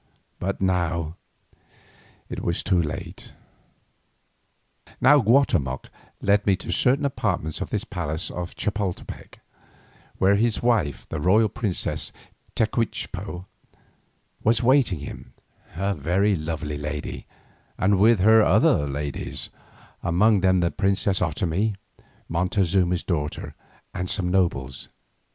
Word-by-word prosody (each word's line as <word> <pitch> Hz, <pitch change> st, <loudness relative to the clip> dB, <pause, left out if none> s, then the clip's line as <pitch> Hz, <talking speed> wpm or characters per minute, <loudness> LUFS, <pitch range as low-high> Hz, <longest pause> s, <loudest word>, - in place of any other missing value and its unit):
But 100 Hz, +2 st, -2 dB
now 85 Hz, -3 st, 0 dB, 1.1 s
it -, -, -6 dB
was 85 Hz, -, -1 dB
too 90 Hz, -2 st, +2 dB
late. 75 Hz, -2 st, -6 dB, 1.7 s
Now 145 Hz, +2 st, +6 dB
Guatemoc 105 Hz, -, +2 dB, 0.3 s
led 100 Hz, +1 st, +2 dB
me 100 Hz, -, +5 dB
to -, -, -6 dB
certain 135 Hz, +3 st, +2 dB
apartments 90 Hz, -, -2 dB
of -, -, -3 dB
this -, -, -2 dB
palace 80 Hz, -2 st, -4 dB
of 90 Hz, -1 st, -6 dB
Chapoltepec, 105 Hz, -3 st, -4 dB, 0.8 s
where 100 Hz, +1 st, +4 dB
his 115 Hz, +1 st, +1 dB
wife, 105 Hz, -, +1 dB
the 80 Hz, -, -3 dB
royal 105 Hz, +7 st, +4 dB
princess 100 Hz, -6 st, -2 dB, 0.4 s
Tecuichpo, 100 Hz, -5 st, -2 dB, 1.0 s
was 115 Hz, +2 st, +2 dB
waiting 120 Hz, -, +3 dB
him, -, -, -9 dB, 0.4 s
a 100 Hz, +3 st, 0 dB
very 95 Hz, +6 st, +1 dB
lovely 75 Hz, -2 st, -4 dB
lady, 75 Hz, 0 st, -5 dB, 0.5 s
and 95 Hz, 0 st, +2 dB
with 110 Hz, -1 st, +5 dB
her 110 Hz, +3 st, +7 dB
other 75 Hz, -, +4 dB
ladies, 70 Hz, 0 st, -4 dB, 0.5 s
among 100 Hz, +5 st, +3 dB
them 95 Hz, -1 st, +3 dB
the 85 Hz, -, +1 dB
princess 100 Hz, -1 st, +1 dB
Otomie, 100 Hz, +4 st, 0 dB, 0.5 s
Montezuma's 90 Hz, 0 st, +1 dB
daughter, 75 Hz, -4 st, -3 dB, 0.4 s
and 90 Hz, 0 st, -3 dB
some 95 Hz, -2 st, -1 dB
nobles. 70 Hz, -8 st, 0 dB
95 Hz, 110 wpm, -24 LUFS, 85-105 Hz, 1.7 s, her